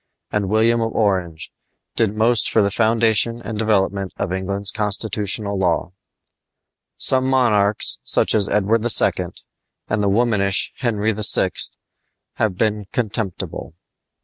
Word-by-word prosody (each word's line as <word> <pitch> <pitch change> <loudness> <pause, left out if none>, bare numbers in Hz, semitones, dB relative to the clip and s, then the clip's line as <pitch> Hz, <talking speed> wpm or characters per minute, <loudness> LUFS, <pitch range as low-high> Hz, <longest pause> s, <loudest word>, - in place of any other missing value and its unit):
and 100 -2 -1
William 115 +2 +2
of 115 0 -1
Orange, 90 -7 -1 0.4
did 110 -2 +1
most 110 -1 +3
for 110 - +2
the 100 - 0
foundation 115 +1 +2
and 110 -3 -6
development 100 -3 0
of 95 -2 -3
England's 100 +1 -1
constitutional 105 -1 -2
law. 90 -2 0 1.1
Some 130 0 +1
monarchs, 110 -6 +1
such - - 0
as 105 -2 +1
Edward 105 +2 +1
II. 110 -6 +2 0.6
and 105 0 -1
the 100 - +1
womanish 100 -3 +1
Henry 110 -3 0
VI., 105 -3 +3 0.9
have 105 -5 -1
been 105 -2 -1
contemptible. 105 -8 -4
105 Hz, 120 wpm, -20 LUFS, 100-115 Hz, 1.1 s, most